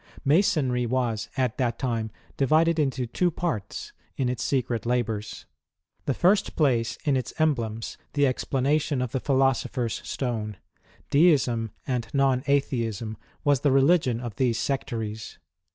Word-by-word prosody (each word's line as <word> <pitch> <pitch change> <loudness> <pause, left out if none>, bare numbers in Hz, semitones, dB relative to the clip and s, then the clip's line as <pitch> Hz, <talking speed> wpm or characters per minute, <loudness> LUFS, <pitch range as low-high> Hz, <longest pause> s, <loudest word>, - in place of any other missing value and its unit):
Masonry 135 -6 +2
was, 115 -3 -1
at 130 -2 0
that 120 -3 0
time, 115 -4 -2 0.3
di\aded 155 +4 +3
into 135 -3 0
two 175 +10 +1
parts, 155 - -4 0.2
in 130 -2 +1
its 125 - -3
secret 125 -4 0
labours. 115 -3 -2 0.6
The 140 - 0
first 195 +3 +2
place 125 -7 +1
in 145 -3 +3
its 130 -3 -3
emblems, 115 -8 -1
the 145 -1 +3
explanation 140 +2 0
of 125 - -4
tlie 130 - -2
philosopher's 135 -3 +1
stone: 110 -6 -3 0.5
Deism 135 -8 +3 0.2
and 125 -3 -2
non 135 -2 +3
Atheism 115 -6 0 0.3
was 145 -2 +3
the 145 - +2
religion 135 -3 +3
of 120 -4 -6
these 120 -3 +1
sectaries. 115 -6 -3
130 Hz, 135 wpm, -26 LUFS, 115-140 Hz, 0.6 s, di\aded